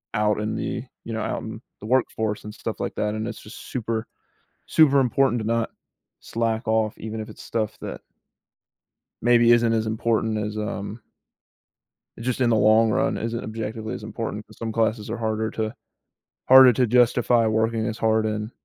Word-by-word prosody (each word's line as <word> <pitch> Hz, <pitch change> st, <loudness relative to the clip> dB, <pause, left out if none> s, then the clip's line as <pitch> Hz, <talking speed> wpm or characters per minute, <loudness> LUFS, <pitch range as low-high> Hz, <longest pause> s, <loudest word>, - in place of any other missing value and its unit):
out 105 Hz, -1 st, +2 dB
in 105 Hz, -, -2 dB
the, 120 Hz, -, -3 dB, 0.2 s
you 115 Hz, -, -6 dB
know, 110 Hz, -, -2 dB
out -, -, -3 dB
in -, -, -7 dB, 0.2 s
the -, -, -10 dB
workforce 110 Hz, -3 st, 0 dB
and 105 Hz, -, -8 dB
stuff -, -, -5 dB
like -, -, -3 dB
that, 105 Hz, 0 st, -1 dB
and 110 Hz, +1 st, -3 dB
it's -, -, -8 dB
just 105 Hz, -, -11 dB
super 115 Hz, -2 st, -3 dB, 0.6 s
super 145 Hz, -3 st, +5 dB
important 125 Hz, -1 st, +2 dB
to -, -, -5 dB
not 115 Hz, 0 st, 0 dB, 0.5 s
slack 115 Hz, 0 st, -2 dB
off 110 Hz, -1 st, +1 dB
even 110 Hz, 0 st, -6 dB
if 110 Hz, -, -5 dB
it's -, -, -12 dB
stuff 110 Hz, -2 st, -2 dB
that -, -, -6 dB, 1.2 s
maybe 120 Hz, 0 st, +5 dB
isn't 120 Hz, -1 st, +4 dB
as 110 Hz, -1 st, +1 dB
important 110 Hz, 0 st, 0 dB
as, 105 Hz, 0 st, -3 dB
um 105 Hz, +1 st, -4 dB, 1.2 s
just 125 Hz, +2 st, -2 dB
in 120 Hz, -, +4 dB
the 115 Hz, -, +3 dB
long 110 Hz, +1 st, +4 dB
run -, -, +1 dB
isn't 115 Hz, +1 st, -3 dB
objectively 110 Hz, 0 st, -5 dB
as -, -, -7 dB
important -, -, -5 dB
'cause -, -, -18 dB
some 115 Hz, -1 st, -4 dB
classes 110 Hz, -1 st, 0 dB
are -, -, -3 dB
harder 110 Hz, 0 st, -1 dB
to 110 Hz, 0 st, -3 dB, 0.8 s
harder 130 Hz, -1 st, +9 dB
to 125 Hz, +3 st, +2 dB
justify 120 Hz, 0 st, +3 dB
working 110 Hz, 0 st, +1 dB
as 110 Hz, +1 st, -4 dB
hard 110 Hz, 0 st, +2 dB
in 105 Hz, 0 st, -3 dB
110 Hz, 180 wpm, -24 LUFS, 110-115 Hz, 1.2 s, harder